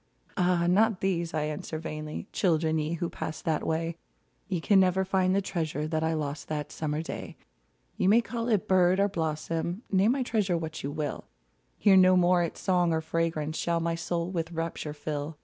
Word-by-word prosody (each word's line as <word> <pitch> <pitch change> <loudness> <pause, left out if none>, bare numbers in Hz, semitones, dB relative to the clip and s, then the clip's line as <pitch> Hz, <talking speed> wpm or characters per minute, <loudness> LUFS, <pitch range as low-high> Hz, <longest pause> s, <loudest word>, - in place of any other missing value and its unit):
Ah! 180 -2 +2
not 200 +3 +3
these, 170 -3 0
I 155 -1 -1
answer 150 +1 -4
vainly; 155 0 -5
Children, 160 -3 +2
ye 155 +2 -2
who 170 +1 -2
passed 155 -1 -6
that 160 -2 0
way, 165 +1 -1 0.5
Ye 185 -4 -1
can 195 +4 +4
never 190 0 +3
find 185 0 +2
the 200 - +1
treasure 155 -5 -2
That 160 0 -1
I 160 0 +1
lost 145 -1 -4
that 150 -1 -4
summer 155 0 -2
day! - - -7 0.6
You 185 - +2
may 220 +3 +6
call 235 0 -4
it 215 -3 +1
bird 185 0 +4
or 200 - +4
blossom; 165 +2 -2
Name 200 +5 +4
my 270 -1 0
treasure 205 -7 0
what 160 -1 -5
you 140 - -3
will; 150 0 -4 0.5
Here 200 -2 +5
no 185 0 +6
more 180 0 +4
its 170 - -3
song 180 -3 +2
or 160 0 +1
fragrance 160 -1 -1
Shall 170 -1 0
my 165 0 -1
soul 170 +1 -2
with 170 -2 -3
rapture 165 -2 -4
fill. 150 0 -4
170 Hz, 195 wpm, -28 LUFS, 155-185 Hz, 0.6 s, may